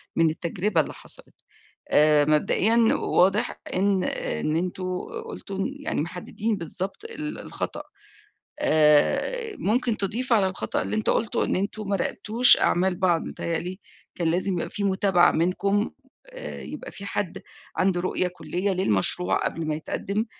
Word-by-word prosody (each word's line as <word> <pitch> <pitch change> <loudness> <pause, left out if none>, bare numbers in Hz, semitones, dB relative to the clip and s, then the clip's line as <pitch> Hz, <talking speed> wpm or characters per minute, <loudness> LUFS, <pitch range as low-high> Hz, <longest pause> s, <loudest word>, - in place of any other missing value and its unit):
من 165 -1 +4
التجربة 170 +2 0
اللي - - -6
حصلت. - - -13 0.5
آآ، 150 0 +5
مبدئيًا 170 +9 +2 0.2
واضح 195 +5 +1
إن 190 0 +2
إن 155 +1 -2
أنتم 185 +2 -2 0.4
قلتوا 200 - -7
إن 255 +8 -2
يعني، 285 - -2
محددين 195 +6 -3
بالضبط 190 - -5
ال 305 -10 -5
الخطأ. - - -5 0.8
آآ، 295 - +3
ممكن 235 +1 +1
تضيف 235 +6 -1
على 205 -4 +4
الخطأ 185 -12 -2
اللي 100 +3 -3
أنت 110 - +1
قُلته 225 - 0
إن - - 0
أنتم 205 +1 -3
ما 200 - +1
راقبتوش 220 +6 +5
أعمال 185 +1 +2
بعض، 175 -3 +1
متهيأ 165 -1 -3
لي 185 +4 -6 0.3
كان 170 -2 -1
لازم 185 +3 0
يبقى 170 - -2
في 200 - -3
متابعة 190 -2 +3
منكم، 195 +5 +1 0.4
آآ، - - -8
يبقى - - -8
في 200 - -9
حد 200 -3 -3 0.3
عنده 185 -1 +2
رؤية 185 0 0
كلية 180 +2 -3
للمشروع 180 - +1
قبل 160 -1 -3
ما 155 - 0
يتقدّم، 200 +7 -3
190 Hz, 145 wpm, -25 LUFS, 170-210 Hz, 0.8 s, آآ